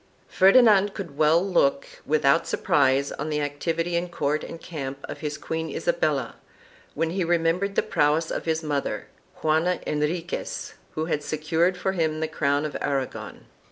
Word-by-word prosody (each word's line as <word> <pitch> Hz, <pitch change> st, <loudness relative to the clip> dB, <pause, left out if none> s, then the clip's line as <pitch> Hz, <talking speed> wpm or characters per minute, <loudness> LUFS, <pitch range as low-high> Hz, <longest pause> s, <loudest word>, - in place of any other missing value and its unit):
Ferdinand 205 Hz, -1 st, +5 dB
could 170 Hz, -8 st, -6 dB
well 155 Hz, +4 st, +4 dB
look 155 Hz, -7 st, +2 dB, 0.2 s
without 150 Hz, +1 st, +3 dB
surprise 140 Hz, 0 st, +2 dB
on 150 Hz, +2 st, -4 dB
the 150 Hz, -1 st, 0 dB
activity 165 Hz, +4 st, -2 dB
in 175 Hz, +1 st, -1 dB
court 150 Hz, -3 st, -1 dB
and 165 Hz, -, -8 dB
camp 140 Hz, -6 st, -6 dB
of -, -, -7 dB
his 150 Hz, -1 st, -4 dB
queen 160 Hz, +1 st, -4 dB
Isabella, -, -, -1 dB, 0.6 s
when 165 Hz, 0 st, 0 dB
he 185 Hz, +1 st, -1 dB
remembered 170 Hz, +4 st, +1 dB
the -, -, +3 dB
prowess 150 Hz, +2 st, +1 dB
of -, -, -3 dB
his 160 Hz, 0 st, 0 dB
mother, 145 Hz, -2 st, -2 dB, 0.3 s
Juana 160 Hz, +3 st, +2 dB
Henri 150 Hz, +3 st, -1 dB
quez, -, -, -5 dB, 0.2 s
who 155 Hz, -, -1 dB
had 155 Hz, -3 st, -1 dB
secured 160 Hz, +4 st, 0 dB
for 190 Hz, -, -1 dB
him 160 Hz, -4 st, -1 dB
the 160 Hz, -, -1 dB
crown 145 Hz, -1 st, 0 dB
of 150 Hz, -, -5 dB
Aragon. 135 Hz, -2 st, -3 dB
160 Hz, 160 wpm, -25 LUFS, 150-175 Hz, 0.6 s, Ferdinand